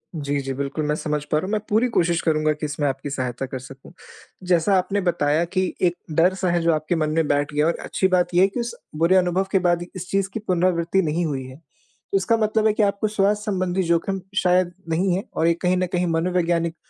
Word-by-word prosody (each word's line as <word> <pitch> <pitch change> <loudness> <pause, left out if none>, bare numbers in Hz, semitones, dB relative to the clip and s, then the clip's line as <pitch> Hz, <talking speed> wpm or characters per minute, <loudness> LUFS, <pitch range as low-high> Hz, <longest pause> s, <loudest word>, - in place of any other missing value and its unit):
जी, 145 -2 -2
जी 135 0 -4
बिल्कुल 140 +3 -3
मैं 150 0 0
समझ 150 -1 -2
पा 150 - +3
रहा 160 - -1
हूँ। 195 - -4
मैं 215 - +1
पूरी 220 +4 +3
कोशिश 170 -1 +2
करूँगा 155 -1 +1
कि 150 +1 -5
इसमें 145 0 -1
आपकी 135 +1 -3
सहायता 130 -1 -3
कर 130 0 -6
सकूँ। 135 +1 -13 0.6
जैसा 180 +2 +3
आपने 195 +2 0
बताया 165 -3 +1
कि 185 +1 -1
1 175 -1 +2 0.2
डर-सा 185 +2 +2
है 175 -1 +1
जो 165 0 +3
आपके 155 +3 -1
मन 155 -1 0
में 160 0 +1
बैठ 145 +1 0
गया 150 +1 +2
और 170 - +1
अच्छी 190 - 0
बात 180 -1 +1
ये 175 - +4
है 195 - +6
कि 200 - -5
उस 235 0 -3 0.2
बुरे 170 +3 +3
अनुभव 185 +1 +2
के 195 - +3
बाद 175 -1 +2
भी 175 - -7
इस 180 0 -7
चीज़ 195 -1 +1
की - - -3
पुनरावृत्ति 180 0 +2
नहीं 165 +1 -1
हुई 140 -4 -3
है। 130 - -10
तो 165 +5 -7
इसका 210 +4 +1
मतलब 215 0 +2
है 215 - +3
कि 215 - +1
आपको 200 +1 +1
स्वास्थ्य 210 0 0
संबंधी 185 -1 0
जोख़िम 170 +3 0 0.2
शायद 180 -1 +3 0.2
नहीं 175 +3 +1
है 195 - -2
और 165 - +2
ये 170 - +4
कहीं 185 0 +2
न 185 - +1
कहीं 180 0 +1
मनोवैज्ञानिक 170 0 0
175 Hz, 240 wpm, -22 LUFS, 155-190 Hz, 0.6 s, है